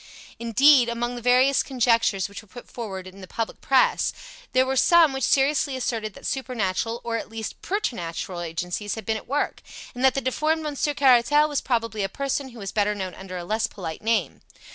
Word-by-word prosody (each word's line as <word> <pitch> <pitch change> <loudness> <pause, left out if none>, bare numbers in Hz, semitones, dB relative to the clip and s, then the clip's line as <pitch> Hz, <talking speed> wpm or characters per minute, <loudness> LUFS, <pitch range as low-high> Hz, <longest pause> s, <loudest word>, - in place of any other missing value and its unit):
Indeed, 240 +2 +5
among 240 +1 -2
the 240 - -7
various 255 +3 +4
conjectures 230 -6 +1
which 200 - -9
were 215 - -21
put 245 +5 -12
forward 195 -6 -6
in 190 +1 -12
the 185 - -10
public 225 +3 -4
Press, 265 -1 +3 0.4
there 260 0 +3
were 265 0 -1
some 330 +1 +5
which 265 -1 -3
seriously 275 0 +2
asserted 225 -5 -3
that - - -12
supernatural, 230 -3 -2
or, 230 -1 -2
at - - -6
least, 220 -3 -6
preternatural, 180 - -3
agencies 180 +5 -3
had 220 -3 -8
been 220 - 0
at 220 - -7
work, 280 +4 -1 0.3
and 250 - -5
that 265 - +5
the 275 - 0
deformed 310 +5 0
Monsieur 295 0 -1
Caratal 275 +3 +5
was 290 -2 -2
probably 230 -3 -1
a 195 - -1
person 275 +3 -3
who 240 - -14
was 195 -3 -5
better 210 0 +1
known 190 -2 -4
under 185 -1 -8
a 175 - -5
less 220 +4 0
polite 165 -6 -7
name. 225 0 0
235 Hz, 200 wpm, -24 LUFS, 205-265 Hz, 0.4 s, Indeed